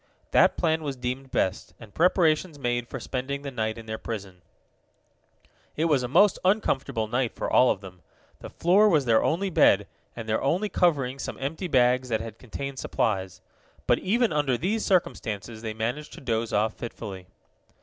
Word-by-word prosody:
That -, -, +4 dB
plan 160 Hz, -2 st, +1 dB
was 145 Hz, -3 st, -4 dB
deemed 130 Hz, +2 st, -4 dB
best, 95 Hz, -4 st, -1 dB
and 110 Hz, -3 st, -13 dB
preparations 165 Hz, -2 st, +2 dB
made 120 Hz, -3 st, -1 dB
for 135 Hz, -, -6 dB
spending 135 Hz, +3 st, -4 dB
the 140 Hz, -, -5 dB
night 110 Hz, -3 st, -2 dB
in 115 Hz, -, -9 dB
their 110 Hz, 0 st, -5 dB
prison. 100 Hz, -5 st, -7 dB, 1.3 s
It 160 Hz, -, 0 dB
was 150 Hz, -5 st, +3 dB
a 125 Hz, -, -2 dB
most 180 Hz, +9 st, +4 dB
uncomfortable 140 Hz, -, +1 dB
night 125 Hz, +1 st, -1 dB
for -, -, -3 dB
all 125 Hz, -, +5 dB
of 95 Hz, -, 0 dB
them. 90 Hz, -3 st, -12 dB, 0.4 s
The -, -, -9 dB
floor 200 Hz, +5 st, +4 dB
was 150 Hz, -7 st, +3 dB
their 115 Hz, -2 st, +4 dB
only 190 Hz, +4 st, 0 dB
bed, -, -, +4 dB, 0.3 s
and 115 Hz, -1 st, -7 dB
their 110 Hz, 0 st, 0 dB
only 180 Hz, +9 st, 0 dB
covering 140 Hz, -9 st, +1 dB
some -, -, -5 dB
empty 160 Hz, +7 st, -3 dB
bags 125 Hz, -3 st, +3 dB
that 110 Hz, -2 st, +1 dB
had 115 Hz, 0 st, -8 dB
contained 135 Hz, +2 st, -6 dB
supplies. 95 Hz, -5 st, -2 dB, 0.4 s
But -, -, +3 dB
even 230 Hz, +1 st, +1 dB
under 145 Hz, -4 st, +1 dB
these 210 Hz, -, -1 dB
circumstances 110 Hz, -, -1 dB
they 110 Hz, -1 st, -5 dB
managed 120 Hz, +7 st, -3 dB
to -, -, -10 dB
doze 115 Hz, -3 st, -1 dB
off 105 Hz, +1 st, +1 dB
fitfully. 100 Hz, -6 st, -8 dB
130 Hz, 180 wpm, -26 LUFS, 110-160 Hz, 1.3 s, all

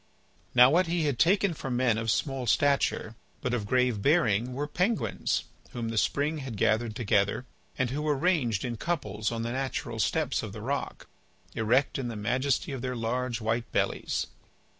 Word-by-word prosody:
Now 125 Hz, +2 st, +8 dB
what 175 Hz, +3 st, +3 dB
he 170 Hz, 0 st, 0 dB
had 145 Hz, -5 st, 0 dB
taken 195 Hz, +1 st, +3 dB
for 135 Hz, -, -6 dB
men 125 Hz, -3 st, +2 dB
of 115 Hz, 0 st, -2 dB
small 135 Hz, +1 st, -1 dB
stature 140 Hz, -3 st, +2 dB, 0.3 s
but 125 Hz, -2 st, -2 dB
of 110 Hz, -4 st, -1 dB
grave 125 Hz, -3 st, +2 dB
bearing 125 Hz, -5 st, +2 dB
were 140 Hz, +3 st, -2 dB
penguins 185 Hz, +9 st, 0 dB, 0.3 s
whom 115 Hz, -2 st, -3 dB
the 115 Hz, -, -4 dB
spring 150 Hz, +6 st, 0 dB
had 130 Hz, -6 st, -6 dB
gathered 110 Hz, +1 st, +1 dB
together, 105 Hz, +1 st, +1 dB, 0.3 s
and 130 Hz, -2 st, 0 dB
who 145 Hz, +3 st, -2 dB
were 150 Hz, -2 st, +1 dB
ranged 135 Hz, -, +1 dB
in 120 Hz, -2 st, -3 dB
couples 110 Hz, -, -2 dB
on 115 Hz, -1 st, -3 dB
the 115 Hz, -, -2 dB
natural 130 Hz, -3 st, -3 dB
steps 150 Hz, +3 st, +1 dB
of 110 Hz, -3 st, -7 dB
the 110 Hz, -, -7 dB
rock, 140 Hz, +3 st, -3 dB, 0.5 s
erect 125 Hz, +6 st, +1 dB
in 130 Hz, -, -2 dB
the 115 Hz, -, -5 dB
majesty 130 Hz, -, 0 dB
of 135 Hz, -3 st, -4 dB
their 125 Hz, 0 st, -3 dB
large 120 Hz, +1 st, -2 dB
white 115 Hz, +2 st, -1 dB
bellies. -, -, 0 dB
125 Hz, 180 wpm, -28 LUFS, 115-145 Hz, 0.5 s, Now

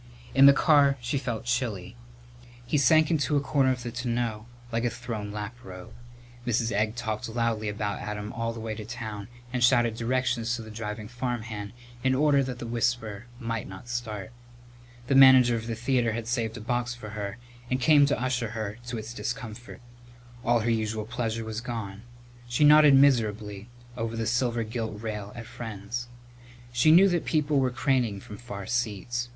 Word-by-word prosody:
In 135 Hz, +1 st, +8 dB
the -, -, +11 dB
car 140 Hz, -1 st, +4 dB
she 125 Hz, +3 st, -2 dB
felt 120 Hz, -5 st, -4 dB
chilly. 120 Hz, -, -2 dB, 0.7 s
He 125 Hz, -, -2 dB
sank 155 Hz, +4 st, +5 dB
into 150 Hz, -2 st, +2 dB
a -, -, +4 dB
corner 140 Hz, -1 st, +2 dB
of 125 Hz, -1 st, -3 dB
the 120 Hz, -, -4 dB
tonneau 120 Hz, -2 st, -2 dB, 0.2 s
like 115 Hz, 0 st, -1 dB
a 120 Hz, -, +2 dB
thrown 115 Hz, -4 st, -5 dB
laprobe. 105 Hz, -3 st, -8 dB, 0.5 s
Mrs. 120 Hz, -1 st, 0 dB
Egg 110 Hz, +2 st, 0 dB
talked 110 Hz, -3 st, -3 dB
loudly 115 Hz, -2 st, -1 dB
about 105 Hz, 0 st, -3 dB
Adam 105 Hz, 0 st, -5 dB
all 115 Hz, 0 st, -2 dB
the 115 Hz, -, -8 dB
way 110 Hz, -1 st, -4 dB
to 110 Hz, -, -7 dB
town 110 Hz, -3 st, -6 dB, 0.3 s
and 125 Hz, -1 st, 0 dB
shouted 120 Hz, -2 st, +4 dB
directions 120 Hz, 0 st, 0 dB
to 115 Hz, -, -6 dB
the 110 Hz, -, -10 dB
driving 105 Hz, 0 st, -5 dB
farmhand 115 Hz, -4 st, -4 dB, 0.3 s
in 130 Hz, 0 st, +3 dB
order 145 Hz, 0 st, +4 dB
that 130 Hz, -2 st, -4 dB
the 120 Hz, -, -6 dB
whisper 115 Hz, -2 st, -2 dB
might 115 Hz, -3 st, -3 dB
not 95 Hz, +5 st, -10 dB
start. 110 Hz, -4 st, -4 dB, 0.7 s
The 135 Hz, -, 0 dB
manager 130 Hz, -3 st, +8 dB
of 115 Hz, 0 st, -4 dB
the 115 Hz, -, -2 dB
theatre 120 Hz, -1 st, +1 dB
had 115 Hz, 0 st, -4 dB
saved 115 Hz, -2 st, -1 dB
a -, -, -8 dB
box 120 Hz, +1 st, -1 dB
for 110 Hz, -3 st, -9 dB
her 105 Hz, -1 st, -5 dB, 0.3 s
and 130 Hz, -, 0 dB
came 145 Hz, +2 st, +6 dB
to 145 Hz, -, 0 dB
usher 125 Hz, -3 st, -1 dB
her 105 Hz, 0 st, -4 dB
to 120 Hz, -1 st, -3 dB
its 110 Hz, +2 st, -6 dB
discomfort. 120 Hz, -1 st, -6 dB, 0.6 s
But -, -, -4 dB
all 120 Hz, -1 st, +5 dB
her 115 Hz, +2 st, +1 dB
usual 110 Hz, -1 st, -1 dB
pleasure 115 Hz, -1 st, -3 dB
was 110 Hz, +1 st, -4 dB
gone. 110 Hz, -5 st, -5 dB, 0.5 s
She 125 Hz, +5 st, +1 dB
nodded 150 Hz, -1 st, +8 dB
miserably 110 Hz, -6 st, +2 dB, 0.3 s
over 115 Hz, -1 st, -3 dB
the 115 Hz, -, -1 dB
silver 120 Hz, 0 st, +1 dB
gilt 110 Hz, -1 st, -4 dB
rail 105 Hz, -2 st, -5 dB
at 120 Hz, -1 st, -7 dB
friends. 115 Hz, +1 st, -6 dB, 0.7 s
She 120 Hz, +6 st, +4 dB
knew 185 Hz, +5 st, +8 dB
that 175 Hz, -2 st, 0 dB
people 150 Hz, -2 st, +1 dB
were 130 Hz, -1 st, +2 dB
craning 125 Hz, -5 st, 0 dB
from 105 Hz, +1 st, -10 dB
far 100 Hz, -4 st, -7 dB
seats. 120 Hz, +1 st, -2 dB
120 Hz, 180 wpm, -27 LUFS, 110-125 Hz, 0.7 s, the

